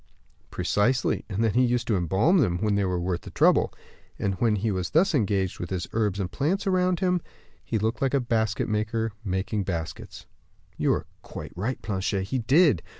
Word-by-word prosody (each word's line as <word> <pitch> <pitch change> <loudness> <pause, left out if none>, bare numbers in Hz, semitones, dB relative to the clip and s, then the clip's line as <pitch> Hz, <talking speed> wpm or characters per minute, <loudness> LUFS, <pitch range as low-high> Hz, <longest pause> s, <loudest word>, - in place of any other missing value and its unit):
"Precisely; 125 +4 +1
and 105 +2 -1
then 110 -3 +2
used 125 0 +2
to 115 - +1
embalm 95 - +3
them, 90 - +2
when 105 +3 0
they 100 -1 +1
were 90 -1 -1
worth 90 0 -2
the - - -10
trouble; - - +3 0.5
and 100 - -1
when 115 -3 +3
he 105 +2 0
was 90 -3 -2
thus 180 +5 +3
engaged 100 -7 0
with 85 - -5
his 90 -2 -2
herbs 105 -3 0
and 90 -2 -2
plants 165 +8 0
about 185 -1 +1
him, 180 -2 +2 0.4
he 115 - -2
looked 110 +2 -1
like 135 0 +1
a - - +4
basket 110 -3 0
maker 110 +1 -1
making 95 +2 -1
baskets." 85 -4 -5 0.5
"You - - +1
are - - -3 0.2
quite - - -8
right, 110 +9 -2
Planchet, 95 -1 -1
he 130 - 0
did." 140 - +4
110 Hz, 190 wpm, -26 LUFS, 95-130 Hz, 0.5 s, a